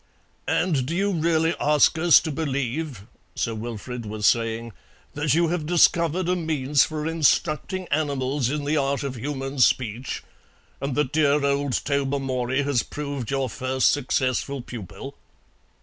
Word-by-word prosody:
"And 150 -8 +1
do 165 - -2
you 200 +2 +1
really 165 -1 +1
ask 150 +1 +4
us 170 0 +7
to 160 - -4
believe," 140 -5 -3 0.3
Sir 115 - -1
Wilfrid 115 +2 -6
was 105 0 -3
saying, 115 0 +1 0.4
"that 145 -1 +1
you 170 0 +3
have 165 -3 -2
discovered 170 0 +3
a 180 - +2
means 150 -5 +2
for 155 -1 -3
instructing 165 +3 +1
animals 140 -3 0
in 145 0 -2
the 150 +2 +1
art 140 0 0
of 140 -2 -3
human 135 +2 -4
speech, 120 0 +1 0.6
and 140 -2 -2
that 145 -1 0
dear 145 -2 +3
old 140 -1 0
Tobermory 135 -2 0
has 140 -4 +1
proved 140 -5 -5
your 135 -1 0
first 130 +2 +1
successful 135 0 -1
pupil?" 115 +4 -8
140 Hz, 145 wpm, -24 LUFS, 130-155 Hz, 0.6 s, us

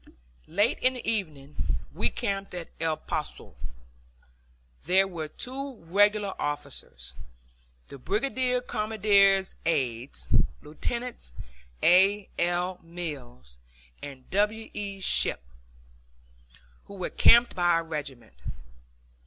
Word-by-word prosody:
Late 205 +8 +1
in 255 +1 +3
the 250 - -7
evening 150 -10 -2 0.4
we - - +1
camped 195 -5 -3
at 175 -2 -6
El 160 -1 0
Poso. - - -5 1.3
There 190 +2 +5
were 165 -4 -5
two 265 - -5
regular 205 +2 +2
officers, 65 - -4 0.7
the 140 - -10
brigade 250 - 0
commander's 200 -3 +3
aides, 130 -6 -1 0.4
Lieutenants 235 - -5 0.5
A. 195 +3 +5
L. 175 +1 0
Mills 140 - -8 0.4
and 135 -3 -9
W. 210 +3 0
E. 200 -1 -5
Shipp, 125 - +3 1.4
who 200 - -11
were 185 -2 -4
camped 235 +1 +6
by 175 -2 +1
our 165 -1 +3
regiment. 145 - -6
185 Hz, 100 wpm, -27 LUFS, 150-210 Hz, 1.4 s, camped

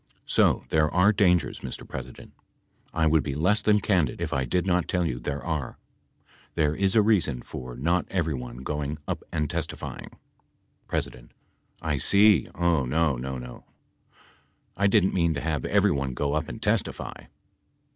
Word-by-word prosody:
So - - +2
there 75 -1 +3
are 95 +4 +4
dangers, 90 -5 +2
Mr. - - -6
President. - - -9 0.6
I 80 0 +1
would 80 0 +4
be 70 -3 -4
less 95 +8 +2
than 105 -1 +4
candid 90 -10 +1
if - - -3
I 65 -2 0
did 90 +9 0
not 90 -1 +1
tell 90 -1 0
you 60 -7 -2
there 70 +3 -4
are. 75 -6 -3 0.8
There 75 -1 +2
is 95 +3 +1
a 110 - +6
reason 85 - +1
for 65 -1 -8
not 85 +8 0
everyone 65 -8 -3
going 75 +1 -3
up - - -3
awl 75 - 0
testifying. - - -5 0.8
P. - - +1 0.8
I 75 -3 0
see, 100 - +4
Oh 85 -5 +2
no, 75 +3 +1
no, 65 +2 -4
no! 60 -1 -9 1.1
I 100 - +2
didn't 100 -2 +3
mean 85 -3 +2
to 70 - -3
have 80 -2 -2
everyone 70 -2 +1
go 70 +2 -1
up 75 0 -1
and - - -7
testify. - - -2
80 Hz, 160 wpm, -26 LUFS, 70-90 Hz, 1.1 s, a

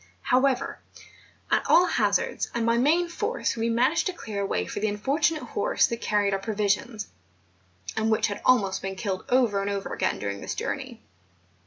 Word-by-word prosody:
However, 260 +1 +1 0.7
at - - +4
all 355 - +7
hazards, - - 0
and 235 -1 0
by 230 0 +3
main 330 +7 +3
force 425 +8 -2
we 230 0 -1
managed 255 +11 +2
to 370 - -2
clear 215 - -5
a - - 0
way 90 - -1
for - - -5
the 215 - 0
unfortunate 295 +9 0
horse - - +1
that 235 0 -4
carried 205 -1 +1
our 195 - 0
pro¬ 210 +2 -4
visions, 210 +2 0 0.9
and 220 0 0
which 220 - +2
had 205 - -3
almost 195 -7 +3
been 195 0 -4
killed 190 -1 -3
over 240 -6 +3
and 200 - -2
over 200 -1 -3
again - - 0
during 100 -1 -4
this - - -4
journey. - - -5
225 Hz, 185 wpm, -26 LUFS, 200-270 Hz, 0.9 s, all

